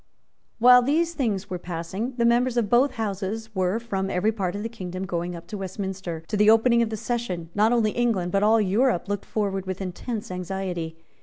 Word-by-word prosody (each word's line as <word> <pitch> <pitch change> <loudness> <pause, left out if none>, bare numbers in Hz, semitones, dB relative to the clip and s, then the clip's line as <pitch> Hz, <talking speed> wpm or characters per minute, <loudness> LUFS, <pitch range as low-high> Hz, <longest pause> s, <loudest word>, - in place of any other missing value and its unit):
While 250 +2 +8
these 325 +6 +1
things 215 - -1
were 180 -2 -4
passing, 180 +8 -4
the 235 - +2
members 240 +1 +3
of 220 -4 0
both 255 +3 +4
Houses 220 0 -3
were 185 +1 +1
from 195 -5 -3
every 195 +4 +1
part 195 -4 -2
of 205 - -4
the - - -1
kingdom 185 -4 -6
going 175 -1 -3
up 170 - -9
to 210 - -5
Westminster. 190 -3 -5
To - - -2
the 210 +1 +5
opening 235 +2 +5
of 230 - +1
the 220 - -4
session, 195 -8 -3
not 215 +2 +3
only 225 -3 +2
England, 215 -8 0
but 195 - +2
all 220 +2 +5
Europe, 210 0 +2
looked 205 0 -3
forward 195 -3 -2
with 185 0 -3
intense 210 +4 -5
anxiety. 180 -3 -4
205 Hz, 205 wpm, -25 LUFS, 185-235 Hz, -, While